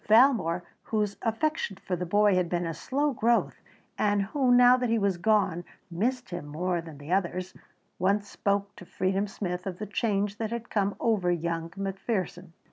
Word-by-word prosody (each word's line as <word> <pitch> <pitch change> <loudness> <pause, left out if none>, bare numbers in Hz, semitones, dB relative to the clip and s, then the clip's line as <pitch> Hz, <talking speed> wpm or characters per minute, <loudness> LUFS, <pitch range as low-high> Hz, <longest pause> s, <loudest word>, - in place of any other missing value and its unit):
Valmore, 215 - +5 0.2
whose 210 -2 -1
affection 235 0 -1
for 185 - -3
the 180 0 -4
boy 205 +2 +4
had 180 -2 +1
been 175 0 -1
a 165 - -2
slow 280 - -1
growth 235 0 +1 0.4
and 205 -1 +2
who, 255 +5 +1
now 245 0 +7
that 250 -1 -1
he 230 - +3
was 200 -4 +1
gone, 190 -3 +2 0.3
missed 245 +7 -1
him 175 -4 -5
more 175 +3 -1
than 160 -3 -11
the 145 +4 -9
others, 185 0 -1 0.5
once 200 +2 +1
spoke 200 0 -1
to 220 - -11
Freedom 190 +3 -1
Smith 180 -2 -4
of 180 -2 -4
the 210 - -4
change 205 -1 -1
that 220 -1 -1
had 235 +1 -5
come 200 -1 +1
over 210 -6 +1
young 170 -1 -1
McPherson. 195 -1 -3
200 Hz, 180 wpm, -28 LUFS, 180-220 Hz, 0.5 s, now